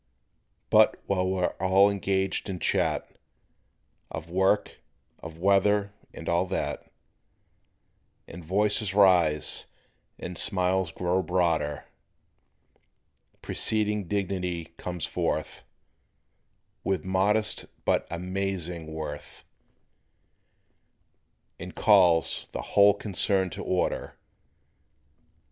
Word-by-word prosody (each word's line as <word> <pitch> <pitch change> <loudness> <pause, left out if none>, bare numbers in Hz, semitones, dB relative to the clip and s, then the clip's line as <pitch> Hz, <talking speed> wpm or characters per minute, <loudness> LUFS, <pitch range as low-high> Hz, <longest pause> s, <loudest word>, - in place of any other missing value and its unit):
But - - +5
while 95 -2 0
we're 95 -1 0
all 95 +2 +5
engaged 95 0 -1
in 95 - -3
chat, - - 0 1.0
Of 80 +1 -7
work, 95 +3 +1 0.4
of 80 0 -9
weather, 100 +2 +2 0.2
and - - -10
all 85 +2 +1
that, 95 - -4 1.4
And 85 +1 -10
voices 100 +3 +1
rise 90 -7 +3 0.5
and 90 - -6
smiles 95 -2 +1
grow 90 +2 0
broader, 85 -5 0 1.6
Presiding 105 -3 -1
dignity 90 -4 -3
comes 90 -1 -4
forth - - -3 1.2
With 95 -1 -1
modest 100 +3 +1 0.2
but - - +1
"amazing" 90 -2 -4
worth 75 -2 -7 2.2
And - - -8
calls 85 -2 +3
the - - -3
whole 100 0 +6
concern 95 -2 -1
to - - -6
order. 90 - -2
95 Hz, 85 wpm, -27 LUFS, 85-100 Hz, 2.2 s, whole